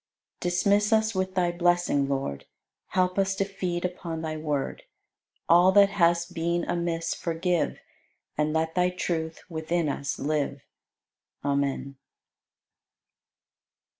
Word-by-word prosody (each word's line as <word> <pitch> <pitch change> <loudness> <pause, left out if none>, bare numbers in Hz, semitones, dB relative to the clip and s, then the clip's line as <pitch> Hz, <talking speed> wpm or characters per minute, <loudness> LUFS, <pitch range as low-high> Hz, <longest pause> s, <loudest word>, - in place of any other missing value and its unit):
95. 175 - 0
Dismiss 205 +4 +3
us 220 0 +3
with 185 0 -2
Thy 175 -2 +2
blessing, 175 -5 +2
Lord; 135 - -2 0.4
Help 185 +1 +1
us 195 0 +1
to 195 - 0
feed 180 -3 -3
upon 170 -2 -4
Thy 155 -1 -3
Word; 150 -3 -2 0.7
All 175 +2 +6
that 200 0 +7
has 170 -3 +3
been 170 0 -1
amiss 170 -1 -1
forgive 170 +1 -1 0.6
And 150 0 +1
let 160 +1 0
Thy 180 0 +2
truth 165 -3 -3
within 165 0 -1
us 140 0 -3
live. 145 -1 -1 0.8
Amen. 140 -1 -1
170 Hz, 120 wpm, -27 LUFS, 155-180 Hz, 0.8 s, that